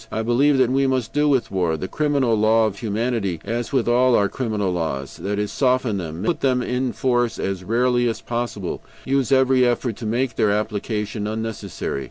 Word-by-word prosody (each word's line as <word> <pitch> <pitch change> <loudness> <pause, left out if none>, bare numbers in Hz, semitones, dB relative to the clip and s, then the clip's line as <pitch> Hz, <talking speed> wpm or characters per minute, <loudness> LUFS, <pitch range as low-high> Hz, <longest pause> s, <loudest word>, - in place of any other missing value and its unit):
I 110 - -2
believe 135 +5 +3
that 130 -2 +3
we 135 +1 +2
must 130 -4 -1
do 150 0 +2
with 135 -4 +1
war 90 -4 0
the 95 - -4
criminal 140 -4 +1
law 110 +1 +4
of 100 -2 -3
humanity 110 -5 -1
as 115 +3 -3
with 130 -5 +1
all 125 +1 +4
our 100 -1 +3
criminal 105 -6 -2
laws, 75 -6 -3
that 100 +1 -3
is, 105 0 -2
soften 125 -6 +1
them, 85 +1 -5
put 170 - 0
them 130 -2 +2
in 125 +1 -1
force 120 -2 0
as 95 -1 -3
rarely 120 +3 +2
as 115 - -3
possible; 115 -6 -4 0.2
use 135 -1 0
every 130 -1 +4
effort 120 -2 0
to 115 - -5
make 120 +3 -1
their 105 - +3
application 105 0 -2
unnecessary. 110 -8 -4
115 Hz, 195 wpm, -22 LUFS, 105-130 Hz, 0.2 s, law